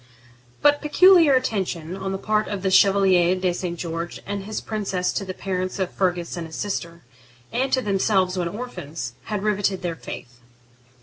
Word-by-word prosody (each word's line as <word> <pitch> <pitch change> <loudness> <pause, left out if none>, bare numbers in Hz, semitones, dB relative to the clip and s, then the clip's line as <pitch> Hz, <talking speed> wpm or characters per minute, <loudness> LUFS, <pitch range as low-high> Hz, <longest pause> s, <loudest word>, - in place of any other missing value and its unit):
But 290 0 +5
peculiar 330 -1 +6
attention 190 -9 -1
on 195 0 -4
the 195 - -2
part 215 +2 0
of 200 -2 -4
the 190 - +1
Chevalier 190 -2 +5
de 185 -1 0
St. 175 -1 -4
George 170 0 -4
and 200 -1 -4
his 215 +1 -3
princess 195 -4 -2
to - - -2
the 185 -1 -6
parents 185 -1 -3
of 190 -2 -2
Fergus 180 -3 -1
and 170 -2 -5
his 160 - -10
sister, 170 -4 -4 0.5
and 260 +3 0
to 260 - +2
themselves 195 -2 +1
when 180 -2 -1
orphans, 170 - -6
had 210 -2 -3
riveted 205 -3 0
their 170 -2 -2
faith. 125 -5 -9
190 Hz, 175 wpm, -23 LUFS, 175-210 Hz, 0.5 s, peculiar